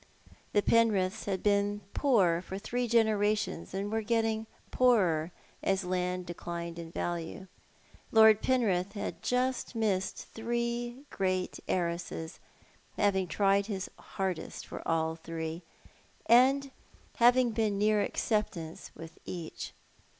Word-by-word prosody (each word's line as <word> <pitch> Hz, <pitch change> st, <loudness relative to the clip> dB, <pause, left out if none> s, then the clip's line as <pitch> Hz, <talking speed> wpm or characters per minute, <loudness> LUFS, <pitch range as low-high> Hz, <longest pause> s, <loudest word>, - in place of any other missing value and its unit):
The 205 Hz, -, +3 dB
Penriths 215 Hz, -3 st, +2 dB
had 195 Hz, -2 st, -2 dB
been 205 Hz, 0 st, +2 dB
poor 190 Hz, -12 st, +3 dB
for 190 Hz, +1 st, -6 dB
three 245 Hz, +4 st, -2 dB
generations^ 215 Hz, -5 st, +1 dB
and 195 Hz, +2 st, -3 dB
were 225 Hz, 0 st, 0 dB
getting 225 Hz, 0 st, 0 dB, 0.2 s
poorer 180 Hz, -10 st, +3 dB, 0.3 s
as 195 Hz, 0 st, +1 dB
land 180 Hz, 0 st, -1 dB
declined 170 Hz, -1 st, -6 dB
in 165 Hz, -1 st, -7 dB
value. 175 Hz, +2 st, -4 dB, 0.7 s
Lord 220 Hz, -1 st, +7 dB
Penrith 200 Hz, -7 st, +1 dB
had 205 Hz, -, -5 dB
just 250 Hz, 0 st, -1 dB
missed 200 Hz, -4 st, 0 dB, 0.2 s
three 240 Hz, +2 st, -2 dB
great 185 Hz, -1 st, -1 dB
heiresses, 170 Hz, -2 st, -2 dB, 0.6 s
having 190 Hz, -2 st, +2 dB
tried 200 Hz, +2 st, +2 dB
his 195 Hz, -4 st, -4 dB
hardest 190 Hz, -3 st, -4 dB
for -, -, -7 dB
all 160 Hz, 0 st, +1 dB
three, 165 Hz, 0 st, -5 dB, 0.6 s
and 270 Hz, +3 st, +5 dB, 0.5 s
having 245 Hz, 0 st, +5 dB
been 215 Hz, -2 st, 0 dB
near 210 Hz, +1 st, +3 dB
acceptance 190 Hz, -8 st, -2 dB
with 165 Hz, 0 st, -11 dB
each. 170 Hz, -3 st, -6 dB
200 Hz, 115 wpm, -30 LUFS, 180-225 Hz, 0.7 s, Lord